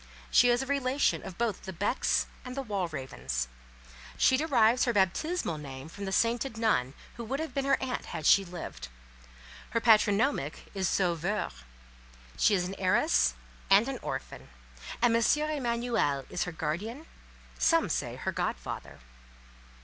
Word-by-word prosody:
She 245 - +6
is 240 +2 +2
a - - -5
relation 275 0 +1
of 185 - -8
both 230 -5 -1
the 190 - -7
Becks 205 +8 +1 0.2
and 250 -1 -7
Walravens; 155 - -3 0.7
she 260 - +5
derives 255 -5 +3
her 240 - +1
baptismal 195 - 0
name 135 0 -8
from 200 +4 -7
the 190 - -3
sainted 230 +3 +1
nun 145 - +1 0.2
who 235 - -5
would 265 +5 -3
have 320 0 -4
been 275 -1 -1
her 275 - +3
aunt 260 -1 -3
had 155 - -5
she 195 - +6
lived; 175 - -7 0.8
her 230 - 0
patronymic 215 - +2
is 190 -2 0
Sauveur; 180 - 0 0.8
she 205 - +4
is 180 -2 0
an 190 - -5
heiress 215 - +3 0.3
and 200 +5 +6
an 270 -2 -4
orphan, - - -6 0.5
and 235 -1 +5
M. 230 - +3 0.3
Emanuel 235 - 0
is - - -1
her 180 - -4
guardian; 190 - -4 0.5
some 330 -6 +3
say 125 -7 -2
her 130 - -3
godfather. - - -4
215 Hz, 150 wpm, -29 LUFS, 170-250 Hz, 0.8 s, She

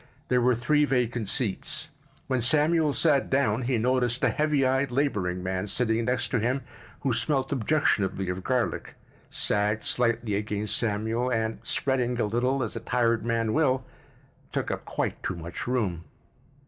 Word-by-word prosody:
There 125 -1 +3
were 125 0 +4
three 150 +6 +2
vacant 120 -6 0
seats. 110 -7 -2 0.4
When 130 -2 0
Samuel 155 +4 +3
sat 140 -2 +2
down 130 -4 +2
he 125 0 0
noticed 125 +1 +1
a - - +5
heavy 150 -3 +1
eyed 135 +1 +2
laboring 105 -10 -1
man 95 +2 -2
sitting 115 +1 0
next 125 0 0
to 125 - +1
him 125 +5 0 0.4
who 130 - +1
smelt 135 +2 0
objectionably 110 -8 +1
of 90 +1 -3
garlic, 125 -2 -1 0.3
sagged 105 +1 0
slightly 115 -3 +1
against 105 0 -1
Samuel 115 +2 0
and, 110 -1 -1
spreading 125 -3 0
a - - +2
little 125 +5 0
as 110 - -4
a - - -2
tired 115 -2 +1
man 115 -1 0
will, 130 -4 +2 0.7
took - - -2
up - - -4
quite - - -3
too 95 - -3
much 85 +5 -6
room. 105 -10 -1
120 Hz, 160 wpm, -27 LUFS, 110-130 Hz, 0.7 s, a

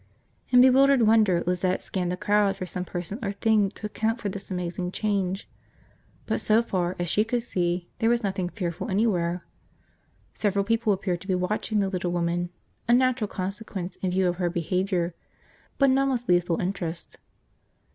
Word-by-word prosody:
In 250 0 +7
bewildered 265 0 +6
wonder 215 -6 +4
Lizette 180 +1 0
scanned 180 -2 -2
the 180 - -3
crowd 205 0 +2
for 185 - -5
some 180 0 -4
person 180 +4 -5
or 200 -1 -2
thing 210 -1 +2
to 210 - -9
account 220 +2 -1
for 210 - -2
this 200 0 -7
amazing 180 -1 -3
change. 195 -2 -1 0.8
But - - -1
so 220 +2 +3
far 180 -5 -1
as 175 - -2
she 205 +5 +2
could 235 +1 -1
see 175 -5 -1
there 225 -1 +3
was 240 0 +2
nothing 190 -3 -1
fearful 175 -4 -4
anywhere. 180 -4 0 0.9
Several 200 -1 0
people 225 0 +1
appeared 185 -3 -1
to 195 - -12
be 190 - +1
watching 210 +3 0
the 195 - +1
little 185 -2 -2
woman, 175 0 -1 0.4
a 235 - +4
natural 255 -3 +2
consequence 195 -1 -5
in 185 - -2
view 185 +1 +2
of 175 0 -1
her 175 -2 0
behavior; 175 +1 -1 0.6
but 275 -2 +4
none 275 +1 +3
with 245 -2 -2
lethal 175 -1 +2
interest. 180 -2 -4
190 Hz, 175 wpm, -26 LUFS, 180-220 Hz, 0.9 s, In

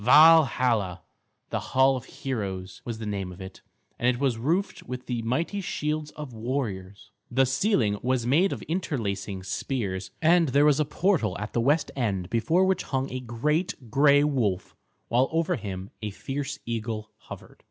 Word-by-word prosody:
Valhalla, 125 - +5 0.5
the - - 0
Hall 130 +1 +3
of 130 0 -6
Heroes, 100 -10 -5
was 115 -2 -5
the 110 - -6
name 100 -3 -3
of 90 - -12
it, 95 0 -9 0.4
and 120 - +1
it 125 -1 +2
was 135 -4 +1
roofed 180 - 0
with 125 0 -7
the 120 -2 -2
mighty 165 - -1
shields 150 -3 -2
of 150 -5 -7
warriors. 110 -5 -4 0.2
The 130 +2 +3
ceiling 130 - +1
was 125 -1 0
made 160 +10 +3
of - - -5
interlacing 110 - -3
spears, 95 -3 -3
and 165 +1 +4
there 140 +2 +4
was 150 -1 +4
a 150 - +2
portal 150 - +1
at 105 +1 -6
the 120 - +1
west 145 +5 +2
end 100 -8 -1
before 160 - +3
which 190 -1 +1
hung 135 0 -2
a 130 - -3
great 125 - -2
gray 145 +2 +5
wolf, 120 -11 0 0.3
while 125 +3 +2
over 165 +2 +1
him 95 - -6
a 110 - -3
fierce 140 +7 -4
eagle 110 -2 -4
hovered. - - -12
125 Hz, 170 wpm, -26 LUFS, 110-150 Hz, 0.5 s, Valhalla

